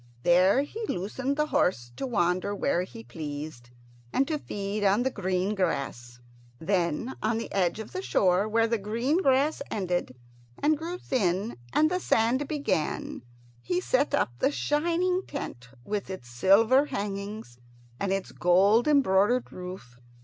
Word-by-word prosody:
There 185 Hz, +9 st, +5 dB
he 440 Hz, +10 st, -7 dB
loosed 250 Hz, +9 st, -2 dB
the 300 Hz, +1 st, +1 dB
horse 120 Hz, -, 0 dB
to 265 Hz, -, -3 dB
wander 185 Hz, -3 st, 0 dB
where 175 Hz, -, +1 dB
he 225 Hz, +5 st, -8 dB
pleased, 145 Hz, -, -7 dB, 0.4 s
and 270 Hz, -, +1 dB
to 310 Hz, -2 st, -1 dB
feed 205 Hz, -3 st, -4 dB
on 200 Hz, +4 st, +3 dB
the 265 Hz, -, 0 dB
green 190 Hz, -1 st, -1 dB
grass. 120 Hz, -, -2 dB, 0.4 s
Then 175 Hz, -, -1 dB
on 220 Hz, +1 st, +1 dB
the 230 Hz, -, -5 dB
edge 180 Hz, -2 st, +1 dB
of 220 Hz, -1 st, -7 dB
the 370 Hz, -, -4 dB
shore, 190 Hz, -, +2 dB
where 225 Hz, +1 st, +2 dB
the 230 Hz, -1 st, 0 dB
green 235 Hz, -, 0 dB
grass 275 Hz, +1 st, +2 dB
ended 180 Hz, -9 st, -2 dB, 0.4 s
and 305 Hz, +1 st, +2 dB
grew 335 Hz, +4 st, -5 dB
thin 205 Hz, -, -1 dB, 0.2 s
and 310 Hz, +2 st, +3 dB
the 365 Hz, -, +1 dB
sand 255 Hz, -1 st, +1 dB
began, 280 Hz, -, -2 dB, 0.4 s
he 175 Hz, +9 st, -1 dB
set 275 Hz, +9 st, +1 dB
up 205 Hz, -, +1 dB
the -, -, +3 dB
shining 345 Hz, +6 st, +1 dB
tent, 125 Hz, -, -6 dB, 0.2 s
with 205 Hz, -2 st, -3 dB
its 185 Hz, -11 st, -7 dB
silver 210 Hz, -, +4 dB
hangings 200 Hz, -, -5 dB, 0.4 s
and 195 Hz, -, -1 dB
its 195 Hz, 0 st, -2 dB
gold 200 Hz, +7 st, +4 dB
embroidered 245 Hz, -4 st, +3 dB
roof. 180 Hz, -10 st, -9 dB
205 Hz, 150 wpm, -27 LUFS, 180-265 Hz, 0.4 s, There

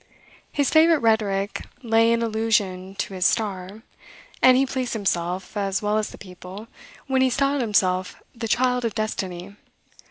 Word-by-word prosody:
His 285 Hz, -2 st, 0 dB
favorite 325 Hz, +1 st, +6 dB
rhetoric 210 Hz, -5 st, 0 dB, 0.2 s
lay 230 Hz, 0 st, +3 dB
in 235 Hz, 0 st, +1 dB
allusion 210 Hz, -4 st, -1 dB
to 205 Hz, -1 st, -4 dB
his 185 Hz, -1 st, -2 dB
star: 200 Hz, 0 st, -1 dB, 0.6 s
and 255 Hz, 0 st, +7 dB
he 270 Hz, -, +3 dB
pleased 260 Hz, -2 st, -3 dB
himself, 185 Hz, -3 st, -2 dB
as 195 Hz, -1 st, -1 dB
well 210 Hz, +1 st, +1 dB
as 215 Hz, -, -3 dB
the -, -, -12 dB
people, 185 Hz, +3 st, -10 dB, 0.4 s
when 265 Hz, -1 st, +1 dB
he 260 Hz, -, +4 dB
styled 275 Hz, +2 st, +1 dB
himself 185 Hz, -5 st, +1 dB, 0.2 s
the 230 Hz, -1 st, -5 dB
"Child 250 Hz, +2 st, +1 dB
of 230 Hz, -3 st, -2 dB
Destiny." 200 Hz, -3 st, -4 dB
215 Hz, 155 wpm, -23 LUFS, 195-240 Hz, 0.6 s, and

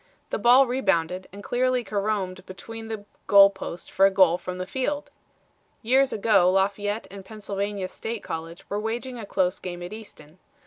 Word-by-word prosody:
The -, -, -1 dB
ball 250 Hz, +3 st, +6 dB
rebounded 185 Hz, -8 st, 0 dB
and 200 Hz, +2 st, -10 dB
cleanly 250 Hz, +1 st, +1 dB
caromed 200 Hz, -3 st, -2 dB
between 225 Hz, +4 st, -9 dB
the 220 Hz, -2 st, -6 dB, 0.2 s
goal 200 Hz, 0 st, +8 dB
post 190 Hz, -3 st, -8 dB
for 195 Hz, -, +5 dB
a -, -, +3 dB
goal 185 Hz, -3 st, +4 dB
from 180 Hz, 0 st, -6 dB
the 185 Hz, -, -4 dB
field. 280 Hz, +7 st, -3 dB, 0.7 s
Years 265 Hz, +4 st, +3 dB
ago 200 Hz, -4 st, +4 dB
Lafayette 205 Hz, +3 st, 0 dB
and 195 Hz, -1 st, -9 dB
Pennsylvania 200 Hz, -2 st, -4 dB
State 225 Hz, +3 st, -6 dB
College 165 Hz, +1 st, -7 dB
were 205 Hz, -, -2 dB
waging 240 Hz, +3 st, -4 dB
a 210 Hz, -, -7 dB
close 185 Hz, -2 st, 0 dB
game 175 Hz, -1 st, -6 dB
at 175 Hz, -, -7 dB
Easton. 185 Hz, -7 st, -12 dB
200 Hz, 170 wpm, -25 LUFS, 185-225 Hz, 0.7 s, goal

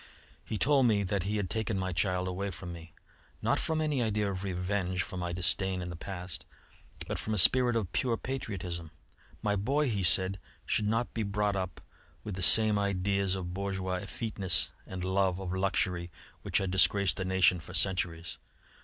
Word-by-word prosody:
He 110 Hz, -, -4 dB
told 135 Hz, +1 st, +4 dB
me 105 Hz, -3 st, +2 dB
that 100 Hz, 0 st, -1 dB
he 105 Hz, +2 st, -1 dB
had 100 Hz, -3 st, -1 dB
taken 110 Hz, +2 st, -2 dB
my 95 Hz, -1 st, -2 dB
child 90 Hz, +3 st, 0 dB
away 95 Hz, +2 st, -3 dB
from 90 Hz, -1 st, -7 dB
me, 85 Hz, -1 st, -11 dB, 0.5 s
not -, -, +1 dB
from 160 Hz, -1 st, -1 dB
any 150 Hz, -4 st, 0 dB
idea 105 Hz, -3 st, 0 dB
of 95 Hz, 0 st, -5 dB
revenge 90 Hz, -1 st, -1 dB
for 95 Hz, -, -8 dB
my 90 Hz, -1 st, -3 dB
disdain 95 Hz, +2 st, 0 dB
in 90 Hz, -1 st, -5 dB
the -, -, -6 dB
past, 90 Hz, +1 st, -6 dB, 0.6 s
but -, -, -3 dB
from 110 Hz, -, -2 dB
a -, -, -2 dB
spirit 120 Hz, +5 st, +6 dB
of 105 Hz, -6 st, -1 dB
pure 120 Hz, -3 st, +1 dB
patriotism. 90 Hz, -11 st, -5 dB, 0.5 s
My 105 Hz, -1 st, +1 dB
boy, 135 Hz, +8 st, +1 dB
he 100 Hz, -3 st, -1 dB
said, 95 Hz, +2 st, +3 dB, 0.3 s
should 105 Hz, -, 0 dB
not 115 Hz, +3 st, 0 dB
be 115 Hz, -, -2 dB
brought 105 Hz, 0 st, 0 dB
up 95 Hz, -2 st, -4 dB, 0.4 s
with 105 Hz, -, -5 dB
the 90 Hz, -, -5 dB
same 105 Hz, +2 st, +7 dB
ideas 100 Hz, -1 st, 0 dB
of 90 Hz, -2 st, -5 dB
bourgeois 95 Hz, -1 st, -2 dB
effeteness 105 Hz, -4 st, 0 dB, 0.2 s
and 95 Hz, -1 st, -6 dB
love 95 Hz, 0 st, +1 dB
of 95 Hz, -1 st, -4 dB
luxury 95 Hz, -2 st, 0 dB, 0.3 s
which -, -, 0 dB
had 95 Hz, -2 st, -1 dB
disgraced 95 Hz, -2 st, +4 dB
the 95 Hz, -, -2 dB
nation 95 Hz, -2 st, +3 dB
for 90 Hz, +3 st, -8 dB
centuries. 90 Hz, -3 st, -1 dB
95 Hz, 185 wpm, -30 LUFS, 90-105 Hz, 0.6 s, same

